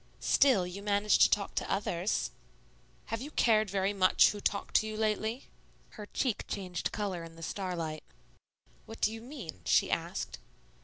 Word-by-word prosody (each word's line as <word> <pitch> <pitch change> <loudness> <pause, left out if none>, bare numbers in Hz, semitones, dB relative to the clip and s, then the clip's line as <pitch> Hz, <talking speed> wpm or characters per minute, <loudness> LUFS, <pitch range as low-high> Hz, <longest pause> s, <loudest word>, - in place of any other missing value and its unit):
"Still, 255 -10 +4
you 180 +3 -7
manage 205 0 +2
to - - +7
talk 200 -1 0
to - - -2
others." 195 -1 -1 0.8
"Have 225 - -1
you 285 - -6
cared 220 -7 +3
very 195 +1 0
much 185 -2 +5
who 205 - -7
talked 200 - -1
to 215 - +1
you 215 0 -5
lately?" 220 +3 -1 0.5
Her 210 -2 -9
cheek 235 -2 -1
changed 185 -4 -3
color 195 -5 -3
in 165 0 -11
the 165 - -11
starlight. 165 -4 -3 0.9
"What 225 - -9
do 215 - +2
you 225 - -7
mean?" 235 - -8
she - - +3
asked. - - -3
205 Hz, 165 wpm, -31 LUFS, 185-220 Hz, 0.9 s, to